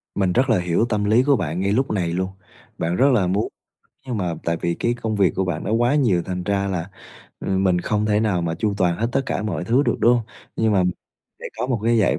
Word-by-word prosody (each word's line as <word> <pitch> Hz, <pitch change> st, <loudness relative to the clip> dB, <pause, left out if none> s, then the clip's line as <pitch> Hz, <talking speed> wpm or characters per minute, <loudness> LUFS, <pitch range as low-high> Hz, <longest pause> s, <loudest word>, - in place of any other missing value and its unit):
Mình 95 Hz, -2 st, +1 dB
rất 130 Hz, +5 st, +2 dB
là 110 Hz, -5 st, +4 dB
hiểu 90 Hz, +5 st, +1 dB
tâm 105 Hz, -2 st, 0 dB
lý 110 Hz, +4 st, +4 dB
của 140 Hz, +1 st, +4 dB
bạn 85 Hz, -, -2 dB
ngay 100 Hz, +1 st, 0 dB
lúc 130 Hz, +6 st, +1 dB
này 95 Hz, -5 st, 0 dB
luôn. 95 Hz, +1 st, -1 dB, 0.5 s
Bạn 85 Hz, +2 st, -1 dB
rất 140 Hz, +8 st, +4 dB
là 100 Hz, -7 st, +2 dB
muốn, 100 Hz, +4 st, 0 dB, 0.6 s
nhưng 125 Hz, -4 st, -3 dB
mà 90 Hz, -4 st, -1 dB
tại 85 Hz, 0 st, 0 dB
vì 85 Hz, -, 0 dB
cái 120 Hz, -, 0 dB
công 115 Hz, -3 st, -3 dB
việc 95 Hz, -6 st, +3 dB
của 95 Hz, -, 0 dB
bạn 85 Hz, -4 st, -3 dB
nó -, -, -3 dB
quá 120 Hz, +5 st, +2 dB
nhiều 115 Hz, -12 st, +2 dB
thành 90 Hz, -1 st, -4 dB
ra 100 Hz, 0 st, 0 dB
là, 90 Hz, -2 st, -3 dB, 0.5 s
ờ, -, -, -5 dB
mình 95 Hz, -2 st, +2 dB
không 105 Hz, +3 st, 0 dB
thể 105 Hz, 0 st, +2 dB
nào 100 Hz, -6 st, +1 dB
mà 85 Hz, -1 st, -1 dB
chu 105 Hz, +3 st, -1 dB
toàn 90 Hz, -3 st, +1 dB
hết 115 Hz, -, 0 dB
tất -, -, +2 dB
cả -, -, -2 dB
mọi 90 Hz, -6 st, -3 dB
thứ 120 Hz, +8 st, +3 dB
được, -, -, +1 dB
đúng 120 Hz, -, +5 dB
hông? 120 Hz, -, 0 dB, 0.3 s
Nhưng 110 Hz, -1 st, +2 dB
mà 95 Hz, -2 st, +3 dB, 0.6 s
sẽ -, -, -10 dB
có -, -, -1 dB
một 125 Hz, -4 st, -1 dB
cái 115 Hz, 0 st, +3 dB
giải 105 Hz, -, +2 dB
100 Hz, 265 wpm, -22 LUFS, 90-115 Hz, 0.6 s, đúng